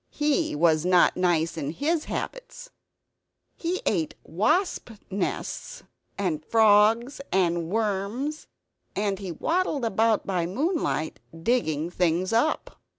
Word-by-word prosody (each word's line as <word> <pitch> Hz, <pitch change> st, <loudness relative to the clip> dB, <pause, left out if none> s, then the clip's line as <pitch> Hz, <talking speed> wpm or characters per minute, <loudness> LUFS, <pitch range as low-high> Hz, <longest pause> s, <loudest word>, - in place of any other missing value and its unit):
He 300 Hz, -, 0 dB
was 160 Hz, 0 st, +3 dB
not 180 Hz, 0 st, +4 dB
nice 170 Hz, -3 st, +1 dB
in 150 Hz, -1 st, -3 dB
his 310 Hz, -, 0 dB
habits. -, -, -6 dB, 0.8 s
He 355 Hz, +2 st, -3 dB
ate 165 Hz, -7 st, 0 dB
wasp 310 Hz, -, 0 dB, 0.2 s
nests 350 Hz, -, -4 dB, 0.3 s
and 170 Hz, -6 st, -1 dB
frogs 225 Hz, -, +4 dB
and 170 Hz, -3 st, +1 dB
worms; 220 Hz, -, -2 dB, 0.5 s
and 200 Hz, -2 st, -1 dB
he 190 Hz, -3 st, -5 dB
waddled 315 Hz, -, 0 dB
about 225 Hz, 0 st, +2 dB
by 180 Hz, -3 st, -1 dB
moonlight, 275 Hz, -, -1 dB, 0.2 s
digging 170 Hz, -9 st, 0 dB
things 180 Hz, +3 st, +1 dB
up. 270 Hz, +8 st, 0 dB
205 Hz, 110 wpm, -26 LUFS, 175-285 Hz, 0.8 s, not